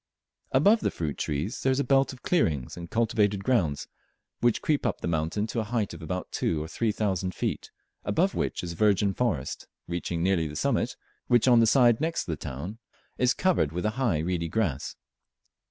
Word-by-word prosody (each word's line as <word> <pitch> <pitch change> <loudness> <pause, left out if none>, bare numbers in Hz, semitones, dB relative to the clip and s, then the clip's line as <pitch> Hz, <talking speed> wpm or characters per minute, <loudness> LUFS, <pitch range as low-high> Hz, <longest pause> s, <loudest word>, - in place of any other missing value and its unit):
Above 200 +12 +5
the - - 0
fruit 75 -4 -3
trees 75 +10 -3
there 130 - +2
is 130 - +1
a - - +2
belt 135 -1 +3
of 130 - -13
clearings 75 - 0
and 85 -1 -8
cultivated 105 -3 +1
grounds, 90 - +1 0.5
which 120 -2 +2
creep 150 -2 +1
up - - -1
the - - -4
mountain 85 +5 0
to 115 +1 -3
a - - 0
height 110 -2 -2
of - - -9
between 90 +2 -3
two 80 -2 -1
and 80 - -7
three 115 -2 0
thousand 95 -4 -1
feet, - - -3 0.3
above 185 +4 +1
which - - -2
is 85 -1 -4
virgin 100 +1 +2
forest, 90 - -2 0.2
reaching 85 -1 -2
nearly 90 -3 +2
to - - -4
the 75 - -8
summit, - - 0 0.3
which 120 0 +4
on 120 -2 +7
the 115 - +5
side 120 0 +5
next 165 +1 0
the 80 - -3
town 75 - -6 0.4
is 125 0 +3
covered 175 - +2
with 90 +4 -3
a 110 - +2
high 120 -7 0
reedy 85 +1 -1
grass. 80 -8 -1
105 Hz, 200 wpm, -27 LUFS, 85-120 Hz, 0.5 s, on